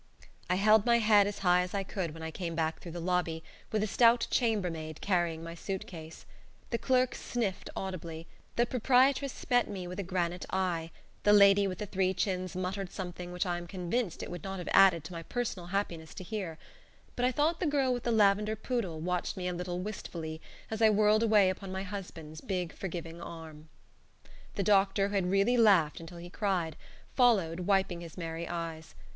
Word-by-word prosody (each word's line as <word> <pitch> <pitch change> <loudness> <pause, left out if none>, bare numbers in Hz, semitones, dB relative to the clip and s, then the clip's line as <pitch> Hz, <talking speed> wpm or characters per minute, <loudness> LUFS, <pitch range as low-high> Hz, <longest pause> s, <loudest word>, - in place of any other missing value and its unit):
I 180 - +3
held 215 +2 +5
my 235 0 +4
head 210 -3 +5
as 205 - -4
high 180 0 +5
as 180 +2 -4
I 195 - 0
could 180 -5 -4
when 165 - -8
I 160 - -4
came 170 0 -4
back 160 0 -1
through 170 - -9
the 175 - -5
lobby, 170 -2 -1 0.3
with 215 -1 +1
a - - 0
stout 230 +2 +4
chambermaid 175 - -1
carrying 175 -4 0
my 165 0 -6
suit 190 +3 -4
case. 160 -2 -10 0.5
The 235 - 0
clerk 255 -1 +2
sniffed 220 -6 -3
audibly; 165 -4 -5 0.3
the 240 - +3
proprietress 260 +3 +2
met 245 -1 +4
me 190 -3 -5
with 180 +2 -6
a 190 -2 -5
granite 180 -1 -1
eye; 175 -4 -1 0.3
the 205 - +5
lady 200 -1 +6
with 185 -2 -4
the 210 - -4
three 190 -1 0
chins 185 -1 -2
muttered 185 +1 -3
something 180 -2 -6
which 180 +2 -1
I 175 -1 -1
am 175 - -9
convinced 185 +3 -2
it - - -7
would 175 -3 -7
not 195 0 -4
have 180 - -5
added 180 -5 +6
to 150 - -9
my 165 - -5
personal 195 -2 -4
happiness 175 -4 -3
to - - -7
hear; 180 -4 -4 0.6
but 245 - -2
I 250 - +3
thought 305 +6 +1
the 360 - 0
girl 275 -3 +2
with 245 - -3
the 235 - -1
lavender 210 0 +3
poodle 215 -8 -3
watched 180 +3 -2
me 180 -1 -3
a 180 - -1
little 180 0 -3
wistfully 165 -6 -6 0.3
as 220 0 -3
I 220 - +7
whirled 215 +1 +4
away 210 -4 +5
upon 190 0 -7
my 190 0 -3
husband's 175 -6 -7
big 180 -4 -3
forgiving 170 -2 -6
arm. 160 -2 -9 0.9
The 200 - 0
doctor, 195 0 +3
who - - -6
had 190 -3 +1
really 195 +6 +3
laughed 195 -10 +4
until 165 +1 -10
he 175 +1 -9
cried, 180 -7 -1 0.4
followed, 195 -10 +3
wiping 190 -2 +1
his 170 0 -10
merry 165 -1 -4
eyes. 165 -2 -5
185 Hz, 200 wpm, -31 LUFS, 170-210 Hz, 0.9 s, I